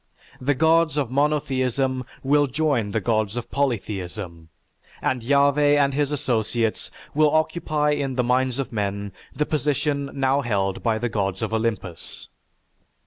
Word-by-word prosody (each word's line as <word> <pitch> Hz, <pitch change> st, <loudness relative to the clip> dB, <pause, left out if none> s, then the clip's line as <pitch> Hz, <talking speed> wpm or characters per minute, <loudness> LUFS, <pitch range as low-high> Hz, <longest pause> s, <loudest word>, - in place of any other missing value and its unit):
The 140 Hz, +2 st, +1 dB
gods 160 Hz, 0 st, +3 dB
of 135 Hz, -5 st, -1 dB
monotheism 135 Hz, -2 st, 0 dB, 0.2 s
will 145 Hz, +2 st, +3 dB
join 140 Hz, -6 st, 0 dB
the 110 Hz, -, 0 dB
gods 110 Hz, +1 st, 0 dB
of 120 Hz, -, -5 dB
polytheism 95 Hz, -10 st, -3 dB, 0.5 s
and 130 Hz, -2 st, -1 dB
Yahveh 140 Hz, +3 st, +4 dB
and 140 Hz, -1 st, +2 dB
his 145 Hz, +1 st, 0 dB
associates 120 Hz, -5 st, -1 dB, 0.2 s
will 150 Hz, +1 st, +4 dB
occupy 155 Hz, -1 st, +1 dB
in 140 Hz, -3 st, -1 dB
the 125 Hz, -, +1 dB
minds 125 Hz, +1 st, +1 dB
of 135 Hz, -3 st, -4 dB
men 100 Hz, -1 st, -2 dB, 0.2 s
the 150 Hz, +3 st, +1 dB
position 145 Hz, -1 st, -1 dB
now 135 Hz, +1 st, +2 dB
held 100 Hz, -6 st, -1 dB
by 115 Hz, -2 st, +1 dB
the 120 Hz, +2 st, -1 dB
gods 100 Hz, -3 st, -2 dB
of -, -, -2 dB
Olympus. 110 Hz, -6 st, -3 dB
130 Hz, 140 wpm, -23 LUFS, 110-145 Hz, 0.5 s, Yahveh